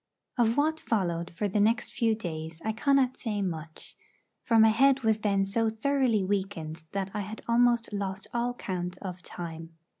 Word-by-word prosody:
Of 235 Hz, 0 st, +2 dB
what 315 Hz, +2 st, +2 dB
followed 175 Hz, -, -1 dB
for 190 Hz, +5 st, -2 dB
the 205 Hz, +2 st, 0 dB
next 225 Hz, +4 st, +2 dB
few 230 Hz, -3 st, +1 dB
days 160 Hz, -5 st, -6 dB
I 220 Hz, -, +1 dB
cannot 260 Hz, +2 st, +2 dB
say 210 Hz, -4 st, -2 dB
much; 160 Hz, -3 st, -6 dB, 0.5 s
for 230 Hz, -, +2 dB
my 220 Hz, 0 st, +7 dB
head 270 Hz, +4 st, +4 dB
was 220 Hz, -1 st, +3 dB
then 200 Hz, -2 st, +1 dB
so 225 Hz, +3 st, +1 dB
thoroughly 230 Hz, -1 st, +1 dB
weakened 185 Hz, -5 st, -3 dB
that 195 Hz, -1 st, -2 dB
I 210 Hz, -, -2 dB
had 210 Hz, +2 st, -6 dB
almost 235 Hz, -1 st, +3 dB
lost 195 Hz, -1 st, -3 dB
all 240 Hz, +1 st, 0 dB
count 180 Hz, -4 st, -4 dB
of 180 Hz, -2 st, -6 dB
time. 165 Hz, -2 st, -7 dB
210 Hz, 175 wpm, -28 LUFS, 180-235 Hz, 0.5 s, my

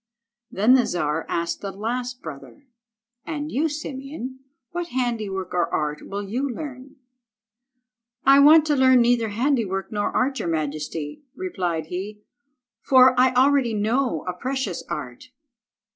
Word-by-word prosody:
Then 215 Hz, +6 st, +3 dB
the 260 Hz, -2 st, +4 dB
Czar 160 Hz, -2 st, -1 dB
asked 170 Hz, 0 st, -2 dB
the 200 Hz, -, -4 dB
last 245 Hz, +5 st, -4 dB
brother— 155 Hz, -, -10 dB, 0.6 s
"And 300 Hz, -1 st, -5 dB
you, 310 Hz, +5 st, +1 dB
Simeon, 275 Hz, -3 st, -6 dB, 0.3 s
what 350 Hz, 0 st, -3 dB
handiwork 220 Hz, -, -3 dB
or 175 Hz, -1 st, 0 dB
art 150 Hz, 0 st, -2 dB
will 200 Hz, +1 st, -4 dB
you 255 Hz, +7 st, -2 dB
learn?" 265 Hz, +1 st, -8 dB, 1.3 s
"I 275 Hz, +1 st, +7 dB
want 305 Hz, +2 st, +7 dB
to 300 Hz, -1 st, +2 dB
learn 260 Hz, -2 st, +5 dB
neither 235 Hz, -2 st, +2 dB
handiwork 220 Hz, -4 st, -1 dB
nor 205 Hz, -1 st, -1 dB
art, 265 Hz, +1 st, 0 dB
your 170 Hz, -, -2 dB
majesty," 150 Hz, -1 st, -3 dB
replied 180 Hz, -, -3 dB
he, 200 Hz, +5 st, -6 dB, 0.6 s
"for 260 Hz, -1 st, +6 dB
I 255 Hz, +1 st, +4 dB
already 260 Hz, -3 st, +3 dB
know 220 Hz, -, 0 dB
a 180 Hz, -, -1 dB
precious 255 Hz, -2 st, -3 dB
art." 130 Hz, -, -6 dB
240 Hz, 135 wpm, -23 LUFS, 180-265 Hz, 1.3 s, I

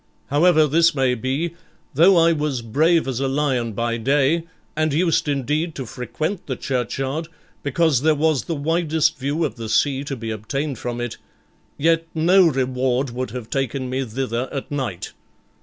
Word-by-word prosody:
However 155 Hz, +1 st, +5 dB
this 165 Hz, +2 st, +3 dB
may 130 Hz, -2 st, +2 dB
be, 130 Hz, +8 st, -2 dB, 0.4 s
though 175 Hz, +6 st, +6 dB
I 165 Hz, 0 st, +5 dB
was 150 Hz, -6 st, -1 dB
brave 155 Hz, +8 st, +2 dB
as 130 Hz, -2 st, -2 dB
a 135 Hz, -, 0 dB
lion 135 Hz, -5 st, 0 dB
by 115 Hz, +2 st, -1 dB
day, 140 Hz, +7 st, +2 dB, 0.3 s
and 155 Hz, 0 st, +1 dB
used 165 Hz, +1 st, +1 dB
indeed 150 Hz, +4 st, -1 dB
to 135 Hz, -, -5 dB
frequent 155 Hz, -, -4 dB
the 130 Hz, -, -2 dB
churchyard, 135 Hz, +5 st, -2 dB, 0.3 s
because 145 Hz, -1 st, +2 dB
there 155 Hz, +1 st, +3 dB
was 155 Hz, -2 st, +1 dB
the 165 Hz, -, -2 dB
widest 160 Hz, 0 st, +1 dB
view 145 Hz, +5 st, 0 dB
of 125 Hz, -6 st, -5 dB
the 115 Hz, -1 st, -6 dB
sea 135 Hz, +4 st, +2 dB
to 140 Hz, -, -3 dB
be 115 Hz, -2 st, -5 dB
obtained 135 Hz, +5 st, -3 dB
from 120 Hz, -1 st, -4 dB
it, 120 Hz, -1 st, -4 dB, 0.6 s
yet 165 Hz, +2 st, +2 dB
no 175 Hz, +3 st, +5 dB
reward 130 Hz, -2 st, 0 dB
would 125 Hz, +1 st, -4 dB
have 120 Hz, 0 st, -7 dB
taken 135 Hz, -1 st, -2 dB
me 130 Hz, +1 st, -1 dB
thither 125 Hz, +1 st, -3 dB
at 135 Hz, 0 st, -5 dB
night. 130 Hz, -11 st, -4 dB
140 Hz, 170 wpm, -22 LUFS, 125-155 Hz, 0.6 s, though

